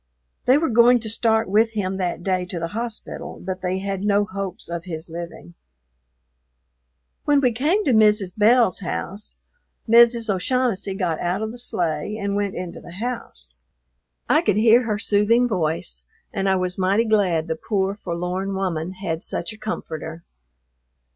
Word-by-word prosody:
They 255 Hz, +3 st, +5 dB
were 320 Hz, 0 st, +1 dB
going 240 Hz, +2 st, +6 dB
to 220 Hz, -1 st, -2 dB
start 225 Hz, 0 st, +2 dB
with 220 Hz, +3 st, +3 dB
him 190 Hz, -3 st, -2 dB
that 175 Hz, -2 st, -2 dB
day 185 Hz, -1 st, 0 dB
to 180 Hz, -1 st, -5 dB
the 165 Hz, 0 st, -3 dB
hospital, 230 Hz, +2 st, -5 dB
but 185 Hz, -1 st, -5 dB
they 180 Hz, 0 st, -1 dB
had 195 Hz, 0 st, -3 dB
no 205 Hz, 0 st, +2 dB
hopes 195 Hz, -1 st, -3 dB
of 170 Hz, 0 st, -5 dB
his 160 Hz, -1 st, -7 dB
living. 165 Hz, -, -8 dB, 1.7 s
When 290 Hz, -1 st, +4 dB
we 255 Hz, -3 st, +3 dB
came 305 Hz, -, +1 dB
to 265 Hz, -, +3 dB
Mrs. 210 Hz, -4 st, +4 dB
Belle's 225 Hz, -1 st, +4 dB
house, 195 Hz, +2 st, -5 dB, 0.5 s
Mrs. 235 Hz, 0 st, +5 dB
O'Shaughnessy 205 Hz, 0 st, 0 dB
got 175 Hz, -5 st, -1 dB
out 180 Hz, +4 st, -1 dB
of 220 Hz, -, -3 dB
the 245 Hz, -, -9 dB
sleigh 175 Hz, -3 st, -2 dB
and 200 Hz, -1 st, -2 dB
went 200 Hz, -1 st, -1 dB
into 180 Hz, -1 st, -6 dB
the 170 Hz, -, -11 dB
house. 185 Hz, -, -6 dB, 0.7 s
I -, -, +4 dB
could -, -, +1 dB
hear 230 Hz, +3 st, +5 dB
her 215 Hz, -2 st, -1 dB
soothing 220 Hz, +4 st, +3 dB
voice, 160 Hz, -, -2 dB, 0.3 s
and 195 Hz, 0 st, 0 dB
I 190 Hz, -, +3 dB
was 185 Hz, 0 st, -2 dB
mighty 195 Hz, +5 st, +2 dB
glad 190 Hz, -7 st, +2 dB
the 160 Hz, -, -1 dB
poor, 195 Hz, +2 st, -1 dB
forlorn 185 Hz, 0 st, -3 dB
woman 180 Hz, -2 st, -2 dB
had 170 Hz, -4 st, -4 dB
such 220 Hz, -, -4 dB
a -, -, -13 dB
comforter. 160 Hz, -6 st, -5 dB
195 Hz, 165 wpm, -22 LUFS, 180-225 Hz, 1.7 s, going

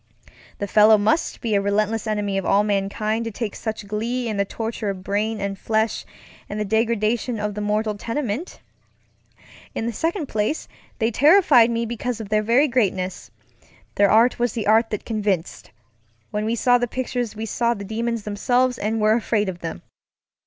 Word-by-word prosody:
The 200 Hz, -, -2 dB
fellow 215 Hz, +2 st, +6 dB
must 220 Hz, +11 st, 0 dB
be 225 Hz, -2 st, -1 dB
a 200 Hz, -, +3 dB
relentless 215 Hz, +2 st, 0 dB
enemy 210 Hz, -2 st, -1 dB
of -, -, -5 dB
all 200 Hz, +2 st, +3 dB
mankind 210 Hz, +2 st, -1 dB
to -, -, -2 dB
take 220 Hz, -1 st, -4 dB
such 220 Hz, -2 st, -5 dB
glee 235 Hz, +4 st, -2 dB
in 215 Hz, -2 st, -2 dB
the 200 Hz, -, +1 dB
torture 225 Hz, 0 st, -4 dB
of 190 Hz, -2 st, -5 dB
brain 210 Hz, +3 st, -1 dB
and 200 Hz, -1 st, -3 dB
flesh 220 Hz, 0 st, -1 dB, 0.4 s
and 210 Hz, -, -4 dB
the 210 Hz, -, -1 dB
degradation 225 Hz, +2 st, 0 dB
of 210 Hz, 0 st, -2 dB
the 210 Hz, -, -5 dB
mortal 210 Hz, +1 st, 0 dB
tenement. 235 Hz, -, -4 dB, 1.1 s
In 225 Hz, -, -2 dB
the 235 Hz, -, -2 dB
second 330 Hz, -, -1 dB
place, 215 Hz, +8 st, -1 dB, 0.3 s
they 225 Hz, 0 st, +1 dB
terrified, 285 Hz, -, +5 dB, 0.2 s
because 240 Hz, 0 st, -3 dB
of 215 Hz, -3 st, -7 dB
their 215 Hz, 0 st, +2 dB
very 240 Hz, +7 st, +3 dB
greatness. 190 Hz, -, -1 dB, 0.6 s
Their 200 Hz, 0 st, +3 dB
art 230 Hz, +3 st, +4 dB
was 240 Hz, -1 st, +1 dB
the 225 Hz, -4 st, -3 dB
art 220 Hz, +2 st, +4 dB
that 210 Hz, -, -4 dB
convincedŌĆöwhen 205 Hz, -6 st, -2 dB, 0.8 s
we 225 Hz, +2 st, 0 dB
saw 245 Hz, +2 st, +3 dB
the 245 Hz, -, 0 dB
pictures 245 Hz, -2 st, -3 dB
we 220 Hz, +1 st, -4 dB
saw 235 Hz, +2 st, 0 dB
the 200 Hz, -1 st, -7 dB
demons 230 Hz, +1 st, -2 dB
themselves 245 Hz, +5 st, +1 dB
and 220 Hz, +2 st, -1 dB
were 215 Hz, 0 st, +4 dB
afraid 220 Hz, -3 st, 0 dB
of 175 Hz, -2 st, -6 dB
them. 165 Hz, -, -6 dB
220 Hz, 175 wpm, -22 LUFS, 205-235 Hz, 1.1 s, fellow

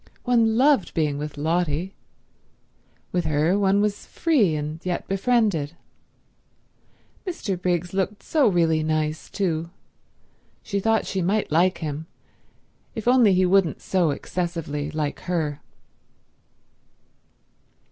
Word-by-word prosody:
One 230 Hz, -3 st, +3 dB
loved 275 Hz, -5 st, +3 dB
being 150 Hz, -3 st, 0 dB
with 150 Hz, 0 st, -6 dB
Lotty. 165 Hz, +3 st, -1 dB, 1.2 s
With 175 Hz, -2 st, 0 dB
her 155 Hz, +5 st, +2 dB
one 200 Hz, 0 st, +3 dB
was 210 Hz, -1 st, -2 dB
free, 245 Hz, -, +2 dB
and 150 Hz, +2 st, -5 dB
yet 180 Hz, -1 st, -3 dB
befriended. 195 Hz, -, +1 dB, 1.5 s
Mr. 340 Hz, -, -3 dB
Briggs 175 Hz, -1 st, -1 dB
looked 195 Hz, +2 st, -2 dB
so 300 Hz, -6 st, +3 dB
really 165 Hz, -5 st, +2 dB
nice, 155 Hz, 0 st, -1 dB
too. 170 Hz, -4 st, -2 dB, 0.9 s
She 200 Hz, -, -2 dB
thought 225 Hz, +2 st, +1 dB
she 190 Hz, -, -2 dB
might 200 Hz, +2 st, 0 dB
like 175 Hz, +4 st, +3 dB
him 150 Hz, +2 st, -5 dB, 0.9 s
if 225 Hz, +1 st, -5 dB
only 245 Hz, -6 st, +5 dB
he 185 Hz, 0 st, +3 dB
wouldn't 180 Hz, -4 st, +2 dB
so 180 Hz, -4 st, +1 dB
excessively 155 Hz, -1 st, -3 dB
like 150 Hz, -1 st, -3 dB
her. 150 Hz, -5 st, -1 dB
180 Hz, 115 wpm, -24 LUFS, 155-205 Hz, 1.5 s, only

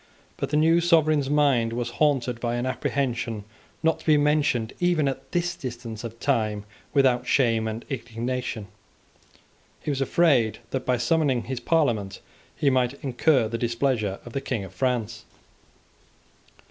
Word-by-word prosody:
But -, -, -3 dB
the 150 Hz, -, +1 dB
new 165 Hz, +2 st, +4 dB
sovereign's 155 Hz, -5 st, +3 dB
mind 140 Hz, -6 st, +2 dB
was 120 Hz, 0 st, -3 dB
haunted 130 Hz, -5 st, +2 dB
by 120 Hz, 0 st, -1 dB
an 120 Hz, +1 st, -2 dB
apprehension 120 Hz, -4 st, -2 dB, 0.4 s
not 160 Hz, 0 st, +2 dB
to -, -, -16 dB
be 155 Hz, -1 st, +6 dB
mentioned 145 Hz, -6 st, +1 dB
even 175 Hz, -5 st, +2 dB
at 135 Hz, -, -4 dB
this 175 Hz, 0 st, 0 dB
distance 120 Hz, -5 st, -7 dB
of 115 Hz, 0 st, -7 dB
time, 105 Hz, -2 st, 0 dB, 0.3 s
without 130 Hz, -3 st, +3 dB
shame 115 Hz, -4 st, +2 dB
and 110 Hz, +1 st, -5 dB
indignation. 125 Hz, -3 st, -4 dB, 1.1 s
He 150 Hz, -, -3 dB
was 140 Hz, -1 st, -2 dB
afraid 135 Hz, -6 st, +3 dB
that 130 Hz, -1 st, -3 dB
by 125 Hz, -1 st, +2 dB
summoning 130 Hz, -1 st, +1 dB
his 130 Hz, +1 st, -4 dB
Parliament 110 Hz, -, 0 dB, 0.4 s
he 140 Hz, -, +2 dB
might 130 Hz, 0 st, +1 dB
incur 130 Hz, -2 st, +2 dB
the 115 Hz, +1 st, -4 dB
displeasure 115 Hz, -4 st, 0 dB
of 120 Hz, -, -10 dB
the 135 Hz, -, -2 dB
King 120 Hz, -6 st, -3 dB
of 95 Hz, -1 st, -10 dB
France. 125 Hz, -4 st, -1 dB
125 Hz, 150 wpm, -25 LUFS, 115-145 Hz, 1.1 s, be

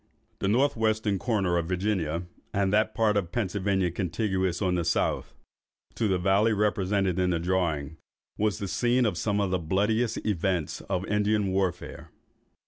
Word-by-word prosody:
The -, -, -1 dB
north 130 Hz, +8 st, +2 dB
western 110 Hz, -3 st, 0 dB
corner 95 Hz, -7 st, +1 dB
of 85 Hz, -, -3 dB
Virginia, 90 Hz, -3 st, -1 dB, 0.3 s
and 100 Hz, 0 st, +1 dB
that 110 Hz, +1 st, +2 dB
part 110 Hz, -2 st, +2 dB
of 95 Hz, -4 st, -1 dB
Pennsylvania 95 Hz, -3 st, 0 dB
contiguous, 95 Hz, +1 st, -1 dB
on 95 Hz, -3 st, +1 dB
the 85 Hz, -1 st, 0 dB
south, -, -, -1 dB, 0.6 s
to 115 Hz, -, 0 dB
the 95 Hz, -2 st, +2 dB
valley 100 Hz, +5 st, +3 dB
represented 100 Hz, -3 st, +1 dB
in 90 Hz, 0 st, +2 dB
the 85 Hz, -2 st, 0 dB
drawing, 80 Hz, -4 st, -1 dB, 0.4 s
was 105 Hz, -4 st, 0 dB
the 100 Hz, -, -4 dB
scene 120 Hz, +7 st, +2 dB
of 105 Hz, -5 st, 0 dB
some 105 Hz, +3 st, 0 dB
of 100 Hz, -2 st, 0 dB
the 95 Hz, -, +1 dB
bloodiest 105 Hz, +7 st, 0 dB
events 90 Hz, -5 st, -1 dB
of 95 Hz, -1 st, -1 dB
Indian 105 Hz, -1 st, +1 dB
warfare. 95 Hz, -2 st, -2 dB
95 Hz, 160 wpm, -27 LUFS, 90-105 Hz, 0.6 s, valley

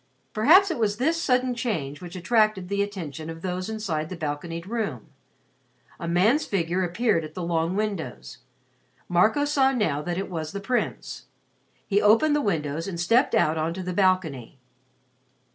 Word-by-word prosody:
Perhaps 340 Hz, -, +6 dB
it 310 Hz, -, -3 dB
was 210 Hz, -2 st, +1 dB
this 320 Hz, +7 st, +1 dB
sudden 255 Hz, -2 st, +1 dB
change 165 Hz, -, -3 dB
which 175 Hz, 0 st, -9 dB
attracted 215 Hz, -1 st, +1 dB
the 200 Hz, 0 st, 0 dB
attention 165 Hz, -7 st, -5 dB
of 165 Hz, 0 st, -8 dB
those 185 Hz, +1 st, -3 dB
inside 175 Hz, -9 st, -3 dB
the 185 Hz, -, -6 dB
balconied 165 Hz, +2 st, -4 dB
room. 205 Hz, -, -4 dB, 0.9 s
A 170 Hz, -, -5 dB
man's 205 Hz, -, +3 dB
figure 180 Hz, -1 st, -1 dB
appeared 180 Hz, 0 st, +1 dB
at 155 Hz, 0 st, -9 dB
the 180 Hz, -, -4 dB
long 170 Hz, +1 st, 0 dB
windows. 200 Hz, -, -4 dB, 0.7 s
Marco 215 Hz, +11 st, +3 dB
saw 275 Hz, -2 st, +3 dB
now 210 Hz, -, 0 dB
that 175 Hz, +2 st, -3 dB
it 195 Hz, -, -3 dB
was 160 Hz, -3 st, -5 dB
the 200 Hz, -, -3 dB
Prince. 240 Hz, +5 st, -3 dB, 0.6 s
He 205 Hz, 0 st, +2 dB
opened 230 Hz, +9 st, +4 dB
the 295 Hz, -, +1 dB
windows 160 Hz, -, -2 dB
and 175 Hz, -3 st, -5 dB
stepped 230 Hz, +8 st, +3 dB
out 160 Hz, -7 st, +2 dB
on 165 Hz, +2 st, -1 dB
to 190 Hz, -, -5 dB
the 180 Hz, 0 st, -4 dB
balcony. 175 Hz, -, 0 dB
185 Hz, 165 wpm, -25 LUFS, 165-220 Hz, 0.9 s, Perhaps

